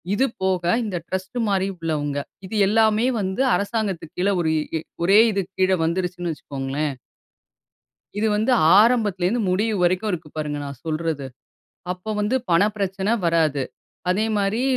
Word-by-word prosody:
இது 260 - +3 0.2
போக 190 -2 +1 0.2
இந்த 195 -4 -4
டிரஸ்ட் 190 +5 -4
மாரி 195 -1 +1
உள்ளவங்க. 150 -4 -2 0.3
இது 220 - -6
எல்லாமே 220 +2 +3
வந்து 190 +5 -1
அரசாங்கத்துக்கு 200 -6 -2
கீழ 200 +2 +2
ஒரு 160 -2 +1 0.3
இ - - -2 0.2
ஒரே 195 +5 +6
இதுக்கு 195 -2 -3
கீழ 185 0 +4
வந்துருச்சுன்னு 175 0 -2
வச்சுக்கோங்களேன். 140 0 -4 1.2
இது 220 - +1
வந்து 220 +5 +2 0.3
ஆரம்பத்துலேருந்து 220 -2 +2
முடிவு 210 +4 +1
வரைக்கும் 185 +4 +1
இருக்கு 160 -3 -5
பாருங்க 150 -1 -3
நான் 140 -3 -9
சொல்றது. 155 -3 -2 0.7
அப்போ 185 +4 -7
வந்து 215 +5 +1 0.2
பண 170 +3 +5
பிரச்சனை 195 +1 -1
வராது. 160 -5 +2 0.5
அதேமாரி 210 +2 +1
185 Hz, 135 wpm, -23 LUFS, 165-210 Hz, 1.2 s, ஒரே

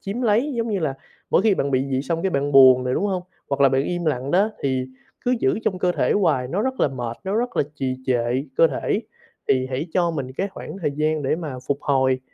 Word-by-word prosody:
chiếm 210 +6 -4
lấy, 240 +6 +2
giống 230 0 -1
như 200 - 0
là 140 -4 -1 0.4
mỗi - - +4
khi 215 -3 +4
bạn 140 -4 -1
bị 130 0 +1
vậy 130 +1 0
xong 165 +3 -2
cái 190 - +1
bạn 140 0 -1
buồn 130 -2 +7
nè, 125 - -1
đúng 200 - 0
hông? 185 -2 -1 0.3
Hoặc 140 0 -1
là 135 - +7
bạn 135 +1 +1
im 175 -1 -2
lặng 140 -2 -1
đó, 200 +5 +3
thì 130 -2 0 0.4
cứ 250 +1 +2
giữ 130 - +2
trong 185 -3 0
cơ 180 0 +1
thể - - +1
hoài 130 -11 +1
nó 195 +8 -1
rất 260 0 -2
là - - +4
mệt, 120 -3 -5
nó 195 +3 -1
rất 245 +1 -2
là - - +4
trì 130 -2 -2
trệ 125 +2 0
cơ 165 - +6
thể, - - -1 0.5
thì 130 -1 +2
hãy 135 +6 -2
cho 175 -2 +2
mình 135 -5 -4
cái 195 +9 -2
khoảng 195 0 -9
thời 150 - +1
gian 155 0 0
để 135 +4 0
mà 155 -6 -5
phục 140 0 +1
hồi, 130 -2 +2
145 Hz, 260 wpm, -22 LUFS, 130-190 Hz, 0.5 s, buồn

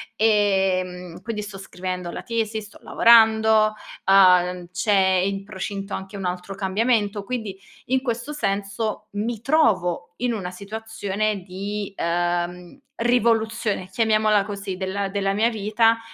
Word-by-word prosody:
Ehm, 190 -5 +1
quindi 215 -2 -4
sto 195 -2 -8
scrivendo 180 -2 -5
la - - -6
tesi, 220 -2 -2
sto 210 - -14
lavorando, 220 -2 +5 0.3
uhm, 180 -2 +5
c'è 190 -1 +2
in 195 0 -2
procinto 195 0 -6
anche 195 +1 -6
un 195 - -5
altro 180 +2 -4
cambiamento, 205 +1 0
quindi 210 -4 -5 0.3
in 260 +1 +1
questo 240 +3 -3
senso 200 -2 -2
mi 215 +2 -3
trovo 185 - +1
in 245 -1 0
una 185 -5 -4
situazione 210 0 -3
di, 200 +2 -5
ehm, 175 +5 -2 0.2
rivoluzione, 225 -4 +1
chiamiamola 215 -2 +2
così, 200 -2 -5
della 195 +1 -2
della 195 0 -1
mia 220 +3 +2
vita, 225 +1 +2
200 Hz, 125 wpm, -23 LUFS, 190-220 Hz, 0.3 s, lavorando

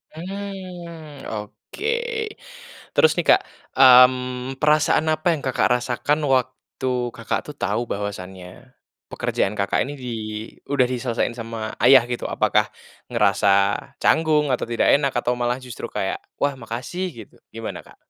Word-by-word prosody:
Hmm, 175 -5 -8
oke, 105 - -8 1.1
terus 475 - +6
nih - - -1
Kak, - - +7 0.4
mmm, 125 0 +6
perasaan 155 +1 +3
apa 155 +3 -2
yang 145 - -7
Kakak 130 - +2
rasakan 130 +5 0 0.2
waktu 130 +1 -3 0.3
Kakak 115 - -2
tuh 150 - -8
tau 120 - 0
bahwasanya, 95 -2 -5 0.7
pekerjaan 95 - -1
Kakak 100 - +1
ini 145 - -6
di - - -5 0.6
udah 130 -3 +3
diselesaiin 120 -1 -1
sama 115 -1 -5
ayah 130 0 +8
gitu, 120 - -3
apakah - - +2 0.5
ngerasa 100 - +3 0.5
canggung 155 -2 +3
atau 125 - -1
tidak 115 - +4
enak 140 -2 +1
atau 120 0 +1
malah 120 +1 0
justru 125 - -7
kayak, - - -2 0.2
"Wah 145 -1 +1
makasih," 120 +11 -4 0.2
gitu, - - -26 0.2
gimana 115 -1 -5
Kak? - - -18
130 Hz, 135 wpm, -22 LUFS, 115-150 Hz, 1.1 s, ayah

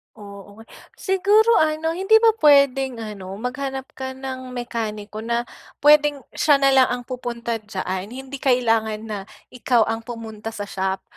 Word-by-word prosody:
Oo. 205 0 -12 0.3
Siguro 415 +4 +3
ano, 315 +1 +1
hindi 385 +6 +2
ba 450 - +7
puwedeng 270 -4 +4
ano, 195 -3 -7
maghanap 265 +4 -5
ka 260 0 -6
ng 260 -1 -6
mekaniko 220 -3 -5
na 235 +2 -1 0.4
puwedeng 295 -2 +5
siya 295 -1 +3
na 275 0 +3
lang 265 -1 +5
ang 245 0 -3
pupunta 235 -2 -4
diyaan, 190 -3 -5
hindi 265 +4 -8
kailangan 225 -5 +1
na 215 -2 -5 0.3
ikaw 245 -2 +2
ang 225 +1 -2
pumunta 225 -2 -7
sa 205 - -4
shop. 190 -1 -3
245 Hz, 145 wpm, -22 LUFS, 220-275 Hz, 0.4 s, ba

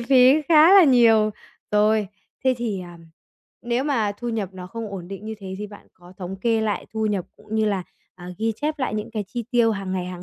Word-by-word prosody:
phí 260 +4 +5
khá 320 +2 +7
là 385 -4 +9
nhiều, 225 -5 +5 0.4
rồi, 210 -1 +2 0.4
thế 260 -1 +3
thì, 215 -6 -2
ờ, 175 -1 -9 0.7
nếu 240 +3 -1
mà 225 -8 0
thu 240 - -4
nhập 220 -4 -2
nó 180 -1 -8
không 220 +2 -7
ổn 180 -3 -7
định 195 +1 -8
như 220 0 -5
thế 190 -2 -7
thì 210 - -5
bạn 205 0 -14
có 175 0 -16
thống 190 +1 -6
kê 225 +3 +1
lại 210 -3 -2
thu 220 0 0
nhập 200 -4 -1
cũng 215 - -9
như 220 0 +2
là, 200 -3 0 0.3
à, 180 -1 -11
ghi 225 0 0
chép 300 +1 -3
lại 260 - -2
những 210 +1 -4
cái 215 -3 -3
chi 235 +2 -5
tiêu 235 -2 +3
hàng 195 -3 -4
ngày 180 -1 -2
hàng 180 -1 -7
215 Hz, 235 wpm, -23 LUFS, 195-240 Hz, 0.7 s, là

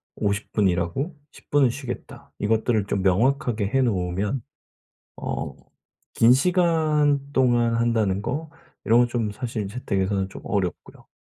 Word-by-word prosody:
'50 105 0 -2
분 105 -3 +3
일하고 90 - -1 0.2
10 - - -18
분은 145 -3 +4
쉬겠다.' 125 0 -7
이것들을 110 0 +1
좀 100 - -1
명확하게 110 +3 +1
해 135 +3 +2
놓으면 100 +1 -1 0.8
어 - - -4 0.6
긴 115 +2 +6
시간 155 -2 +3
동안 120 -3 +3
한다는 110 -4 +1
거 150 +7 -3 0.3
이런 115 +2 +5
건 120 - +3
좀 115 -3 -1
사실 110 -2 -4
재택에서는 100 -3 -1
좀 95 - -11
어렵고요. 95 -5 -3
115 Hz, 255 characters per minute, -24 LUFS, 100-135 Hz, 0.8 s, 긴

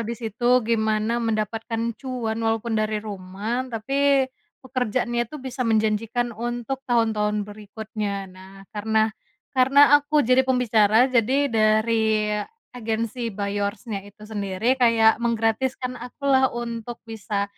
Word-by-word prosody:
di 230 +1 -4
situ 240 +2 +1
gimana 220 0 +1
mendapatkan 225 +1 -2
cuan 240 -4 -3
walaupun 225 +1 -1
dari 215 0 0
rumah 210 +5 -4
tapi, 270 +4 +2 0.4
pekerjaannya 240 -2 -1
itu 305 - -8
bisa 260 -2 -7
menjanjikan 225 +1 0
untuk 240 +3 -4
tahun-tahun 210 -3 +1
berikutnya 210 -1 -5
nah 190 +1 -14 0.2
karena 220 +1 +1 0.4
karena 265 +2 +4 0.2
aku 290 -1 +1
jadi 255 +1 +5
pembicara 235 -4 +3
jadi 260 +2 +2
dari 220 -1 +2 0.4
agensi 230 0 -3
By 205 -1 -3
Yours-nya 200 +1 -3
itu 210 +1 -15
sendiri 205 +2 -1
kayak 230 -1 +4
menggratiskan 235 +2 -1
aku 250 +4 -10
lah 265 0 +5
untuk 235 0 -5
bisa 210 -3 -3
225 Hz, 120 wpm, -24 LUFS, 215-245 Hz, 0.4 s, jadi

